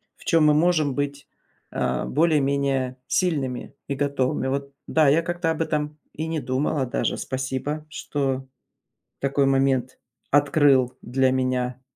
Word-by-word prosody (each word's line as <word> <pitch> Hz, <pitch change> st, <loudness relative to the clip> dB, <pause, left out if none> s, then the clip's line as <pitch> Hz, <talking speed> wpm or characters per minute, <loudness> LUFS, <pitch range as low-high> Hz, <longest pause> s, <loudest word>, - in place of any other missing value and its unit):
в -, -, -19 dB
чем 165 Hz, -2 st, +4 dB
мы 150 Hz, -, +6 dB
можем 155 Hz, -2 st, +2 dB
быть, 145 Hz, +1 st, -3 dB, 0.4 s
а, -, -, -1 dB
более-менее 140 Hz, -4 st, +1 dB
сильными 140 Hz, -9 st, -1 dB
и 140 Hz, -, -2 dB
готовыми. 135 Hz, -2 st, 0 dB
Вот, 140 Hz, +1 st, -3 dB
да, 155 Hz, -2 st, +3 dB
я 155 Hz, +4 st, +4 dB
как-то 175 Hz, 0 st, -1 dB
об 160 Hz, 0 st, 0 dB
этом 150 Hz, -1 st, -2 dB, 0.2 s
и 155 Hz, +2 st, -4 dB
не 160 Hz, -1 st, -1 dB
думала 135 Hz, +2 st, -1 dB
даже. 125 Hz, -, -1 dB
Спасибо, 135 Hz, +3 st, -3 dB
что 135 Hz, -3 st, -2 dB, 0.7 s
такой 140 Hz, 0 st, +1 dB
момент 135 Hz, -2 st, +1 dB, 0.3 s
открыл 140 Hz, -3 st, +3 dB
для 130 Hz, +1 st, +1 dB
меня. 130 Hz, -1 st, -1 dB
140 Hz, 135 wpm, -24 LUFS, 130-150 Hz, 0.7 s, мы